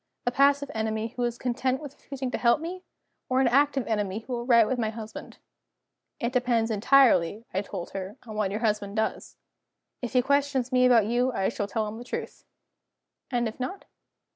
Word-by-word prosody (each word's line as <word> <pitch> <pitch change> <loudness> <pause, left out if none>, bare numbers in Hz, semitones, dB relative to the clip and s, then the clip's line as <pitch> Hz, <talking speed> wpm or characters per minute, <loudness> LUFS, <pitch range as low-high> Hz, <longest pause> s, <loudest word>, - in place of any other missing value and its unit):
"A 245 - +2
passive 280 +1 +3
enemy 220 0 -2
who 250 - -4
is 240 0 -2
content 255 +1 -1
with 290 -3 -8
refusing 270 -3 -6
to - - -2
help 235 +3 +4
me? 350 +3 -6 0.5
Or 255 0 +2
an 265 - +4
active 275 +1 +3
enemy 210 -1 -1
who 250 - -7
will 240 0 -3
write 235 -3 +6
to 250 -2 -1
my 220 - 0
husband?" 220 0 -8 0.8
"It 235 +2 -2
depends 240 -3 +1
entirely," 225 -3 +4
I 190 - +1
told 195 -3 -7
her, 195 +1 -6
"on 215 -2 -8
what 210 -2 0
your 210 +3 -3
husband 210 -2 -1
does. 220 0 -2 0.6
If 245 -1 -4
he 250 -1 +4
questions 280 -2 +1
me 255 0 +5
about 235 -4 +5
you, 245 +3 +1
I 190 -4 0
shall 205 -3 -3
tell 215 +1 -1
him 215 +2 -6
the - - -7
truth." - - -6 0.8
"And 240 -2 0
if 220 - -7
not?" 260 +10 -5
240 Hz, 195 wpm, -27 LUFS, 220-260 Hz, 0.8 s, write